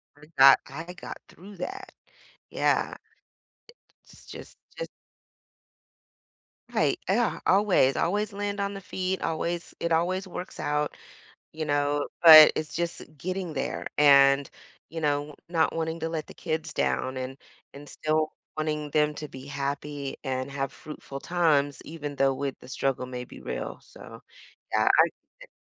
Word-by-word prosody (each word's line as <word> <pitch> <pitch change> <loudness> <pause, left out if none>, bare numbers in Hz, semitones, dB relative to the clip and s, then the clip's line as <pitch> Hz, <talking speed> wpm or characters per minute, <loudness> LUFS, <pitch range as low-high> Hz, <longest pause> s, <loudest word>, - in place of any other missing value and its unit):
Heard 150 +2 -18
that. 135 0 +9
"I 165 +6 -8
got 185 - -8
through 195 +3 -13
that." 180 +1 -6 0.6
Yeah. - - +1
I - - -10 1.1
it's - - -18
just - - -11 0.2
just - - -4 1.9
Right. - - +2
Ah, - - +4
yeah, - - +1
always, 190 -9 +4
always 205 +5 0
land 205 0 -3
on 200 0 -1
the 195 - -7
feet. 185 0 -3
Always 170 +1 -3
it 170 - -2
always 185 +4 +1
works 180 0 -7
out, 150 0 -1 0.6
you 155 0 -4
know, 145 0 0 0.2
but 155 -2 +11
it's 155 - -4
just 170 0 -3 0.2
getting 180 +1 -4
there 135 - -3
and, 140 -1 +6 0.4
you 165 +1 -6
know, 145 -1 -1
not 165 -2 +1
wanting 160 0 -2
to 160 - -2
let 160 -2 -4
the - - -12
kids 155 -1 -3
down 130 -2 -1
and 130 +1 -5 0.4
and 145 +1 -11
still 155 0 -1 0.2
wanting 150 -1 -2
them 150 0 +2
to 150 0 -7
be 130 0 -10
happy 140 0 -4
and 130 0 -2
have 135 -1 -3
fruitful 140 -2 -9
times 150 -5 +1
even 150 -2 -6
though 135 0 +3
with 135 0 -3
the - - -14
struggle 135 0 -1
may 125 -1 -6
be - - -13
real. - - -5
So - - -13 0.5
yeah, - - +3
I - - +6 0.4
eh - - -15
150 Hz, 155 wpm, -27 LUFS, 140-170 Hz, 1.9 s, but